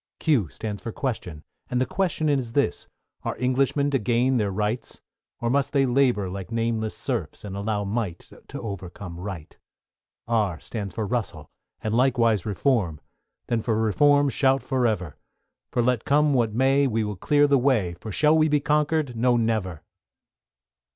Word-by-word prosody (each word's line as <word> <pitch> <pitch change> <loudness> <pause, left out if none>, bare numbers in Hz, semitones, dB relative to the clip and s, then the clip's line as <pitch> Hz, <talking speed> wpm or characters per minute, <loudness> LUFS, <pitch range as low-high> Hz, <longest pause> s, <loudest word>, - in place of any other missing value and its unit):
=Q= 130 - +2
stands 105 +2 -6
for 115 - -5
Question, 95 - -4 0.3
and 125 - 0
the 130 - +2
Question 175 -3 -1
is 130 -6 0
this, 140 -10 0 0.3
Are - - -4
Englishmen 135 +3 +1
to 135 - +2
gain 120 +4 +2
their 105 -3 +1
Rights? 105 +4 -2 0.4
Or 120 0 -1
must 140 +1 +1
they 135 -2 +4
labour 125 -6 +2
like 95 +1 -6
nameless 115 -1 -1
serfs, - - -4
And 100 -2 -6
allow 105 +1 -1
Might 100 -4 -3 0.2
to - - -7
overcome 90 -3 -7
Right? 90 -5 -7 0.7
=R= 105 -8 0
stands 100 -5 -6
for 110 - -2
Russell, 120 +1 -3 0.3
and 110 - -1
likewise 115 -5 +2
Reform: 100 - 0 0.5
Then 115 -2 0
for 110 -1 0
Reform 145 +6 +4
shout 135 0 +2
for 130 -3 +1
ever; 90 -8 -3 0.5
For 120 - 0
let 125 -2 +1
come 150 +1 +3
what 120 -4 +2
may, 135 +4 +3
we 115 -3 0
will 105 -1 -3
clear 145 +10 +3
the 140 -2 +4
way, 120 -10 +2
For 110 - -6
shall 150 +9 +3
we 155 0 +3
be 150 0 +3
conquered? 150 -2 +1
No, 120 +1 +3
never! 110 -8 -1
115 Hz, 165 wpm, -25 LUFS, 105-135 Hz, 0.7 s, they